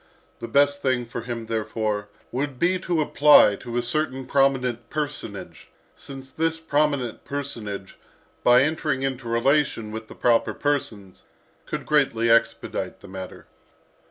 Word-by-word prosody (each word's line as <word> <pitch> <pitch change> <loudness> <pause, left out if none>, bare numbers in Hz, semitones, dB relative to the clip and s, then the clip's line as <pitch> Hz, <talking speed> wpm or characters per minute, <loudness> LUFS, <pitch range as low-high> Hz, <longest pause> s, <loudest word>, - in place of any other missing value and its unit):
The 115 - -6
best 145 +3 +3
thing 130 -2 0
for 115 0 -6
him, 115 -1 -5
therefore, 110 -2 -2 0.2
would 135 +1 -3
be 180 +6 +2
to 175 -3 0
apply 145 -8 +6
to 120 -1 -6
a 120 - +1
certain 130 +1 -2
prominent 125 -4 +1
personage; 150 -1 -5 0.3
since 135 -1 -10
this 165 0 -1
prominent 145 -6 0
personage, 110 -9 -5 0.4
by 125 +1 +6
entering 150 -2 -1
into 130 -2 -3
relation 115 -2 +1
with 110 0 -6
the - - -12
proper 120 -1 +2
persons, 110 -10 -2 0.5
could - - -4
greatly 115 -6 +2
expedite 115 0 0
the - - -12
matter. 95 -1 -8
130 Hz, 135 wpm, -24 LUFS, 115-145 Hz, 0.5 s, apply